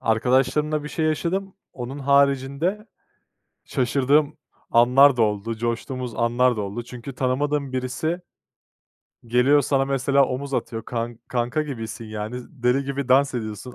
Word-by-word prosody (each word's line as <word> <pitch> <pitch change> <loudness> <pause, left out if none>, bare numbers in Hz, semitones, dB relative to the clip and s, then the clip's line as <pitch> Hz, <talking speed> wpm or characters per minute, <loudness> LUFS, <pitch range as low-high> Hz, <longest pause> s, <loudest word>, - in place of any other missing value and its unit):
Arkadaşlarımla 135 +6 +1
bir - - -5
şey 160 - -2
yaşadım. 185 +5 -1 0.2
Onun 125 +3 -6
haricinde 140 +8 +1 0.8
şaşırdığım 140 +3 +1 0.3
anlar 125 +4 +6
da 120 - +3
oldu, 105 +1 0
coştuğumuz 120 +1 -3
anlar 120 +1 +2
da - - -2
oldu. 100 +4 -4
Çünkü 125 +2 -9
tanımadığım 140 +2 -1
birisi 130 +7 -2 1.1
geliyor 125 +5 +4
sana 135 0 +1
mesela 140 +1 +2
omuz 135 +2 -4
atıyor 115 -3 -3
kan 115 -1 -4
kanka 125 +5 -1
gibisin 115 -6 -6
yani, 110 +2 -5
z 120 - -13
deli 130 -1 0
gibi 140 -1 -3
dans 135 +1 +4
ediyorsun, 110 +1 -5
130 Hz, 135 wpm, -23 LUFS, 120-140 Hz, 1.1 s, anlar